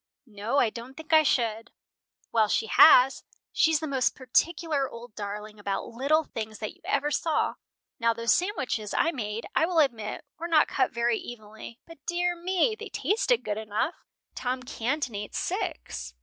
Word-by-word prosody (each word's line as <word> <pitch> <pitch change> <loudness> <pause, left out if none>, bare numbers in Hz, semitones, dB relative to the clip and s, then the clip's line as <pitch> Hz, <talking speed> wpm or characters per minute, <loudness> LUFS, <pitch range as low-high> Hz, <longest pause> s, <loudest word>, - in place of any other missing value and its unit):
"No, 220 +2 -3
I 235 -5 +3
don't 245 +4 -9
think 320 0 -5
I 315 - +8
should." 230 -6 0 0.6
"Well, 220 -2 +3
she 220 - +1
has. 255 +4 +7 0.3
She's 320 -2 +3
the 315 - -4
most 270 -4 +1
particular 290 +2 0
old 235 -1 -11
darling 210 +1 -6
about 200 -1 -3
little 280 +7 +1
things 220 -6 -6
that 215 0 -5
you - - -27
ever 295 +2 0
saw. 320 +1 +1 0.5
Now 230 -1 +3
those 230 0 +2
sandwiches 260 - -1
I 330 - +3
made 220 -5 -4
I 320 - +3
will 355 -1 -2
admit 240 -6 0
were 335 - -3
not 320 -3 +4
cut 260 - +1
very 235 -1 +1
evenly, 220 0 -10
but, 330 -4 -15
dear 350 0 0
me! 370 +6 +1
they 440 +1 -8
tasted - - +1
good 210 0 -2
enough. 220 +10 -1 0.4
Tom 255 +1 -3
Canton 255 +1 -2
ate 205 0 -6
six. - - -4
250 Hz, 170 wpm, -27 LUFS, 220-315 Hz, 0.6 s, I